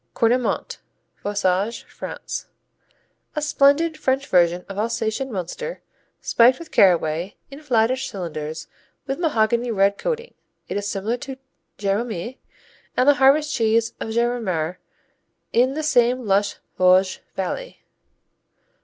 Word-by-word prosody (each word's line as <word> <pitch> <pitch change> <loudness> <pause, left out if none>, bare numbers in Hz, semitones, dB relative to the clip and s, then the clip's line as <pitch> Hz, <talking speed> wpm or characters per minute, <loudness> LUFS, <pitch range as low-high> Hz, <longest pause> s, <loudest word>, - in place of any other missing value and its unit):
Cornimont 240 +2 +1 0.4
Vosges, 200 +2 0
France - - -6 0.9
A 300 - -1
splendid 300 +2 +3
French 270 +1 +1
version 175 -6 +2
of 195 +1 -6
Alsatian 225 +3 -1
Münster 220 - -5 0.4
spiked 245 +2 +4
with 335 - -11
caraway, 175 0 +3 0.2
in 275 - -9
flattish 255 -2 +1
cylinders 160 -4 -5 0.4
with 270 +3 -3
mahogany 235 -6 +1
red 200 -2 +2
coating. 480 -1 -3 0.3
It - - -4
is 205 0 -2
similar 205 +4 -2
to 265 +1 -7 0.4
Géromé 215 +3 -2 0.6
and 255 - +3
the 290 - +8
harvest 295 +3 +5
cheese 230 0 +2
of - - -4
Gérardmer 220 -8 -1 0.8
in 255 +3 +3
the 310 - -2
same 250 -4 +2
lush 200 0 +2 0.2
Vosges 185 +1 +4 0.2
Valley. - - -4
230 Hz, 120 wpm, -22 LUFS, 195-265 Hz, 0.9 s, the